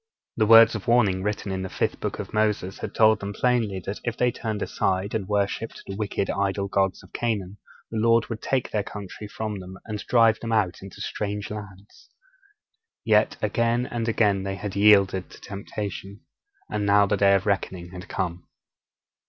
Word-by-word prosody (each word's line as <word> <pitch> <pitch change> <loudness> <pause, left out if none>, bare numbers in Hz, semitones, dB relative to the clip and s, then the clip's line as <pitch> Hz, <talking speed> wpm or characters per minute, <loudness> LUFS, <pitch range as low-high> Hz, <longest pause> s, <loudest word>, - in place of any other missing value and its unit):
The 110 -2 +2
words 115 0 +8
of 110 -4 -6
warning 110 -6 +3
written 105 0 -2
in 95 0 -2
the 95 - -4
fifth - - -2
book - - -3
of - - -7
Moses 105 -3 0
had - - -6
told 110 -1 +5
them 100 0 -5
plainly 115 -5 +1
that 100 - -4
if 120 -1 -3
they 125 0 +2
turned 110 -4 -3
aside 95 +2 -1
and 105 -4 -2
worshipped 105 +2 -2
the 95 - -6
wicked 100 -2 -2
idol 100 0 -1
gods 95 -1 0
of - - -18
Canaan, 105 -4 -2 0.3
the 110 - -2
Lord 115 +1 +4
would 115 -2 -5
take 130 -2 -1
their 105 - +1
country 105 0 -8
from 105 -1 -4
them 95 0 -9
and 105 -1 -4
drive 115 -2 +4
them 115 - -5
out 100 -6 +1
into 95 -1 -10
strange 105 -1 -4
lands. 105 -1 -10 1.0
Yet - - +3
again 115 +1 +1
and 120 -2 -3
again 105 -4 +2
they 95 0 -3
had 100 -1 -6
yielded 100 -3 +4
to - - -14
temptation. 100 0 -6 0.5
And 105 - -2
now 100 0 +5
the 100 +1 +1
day 100 0 +5
of 95 +2 0
reckoning 95 -3 -2
had 90 +2 -9
come. 90 -2 -3
105 Hz, 185 wpm, -25 LUFS, 95-110 Hz, 1.0 s, words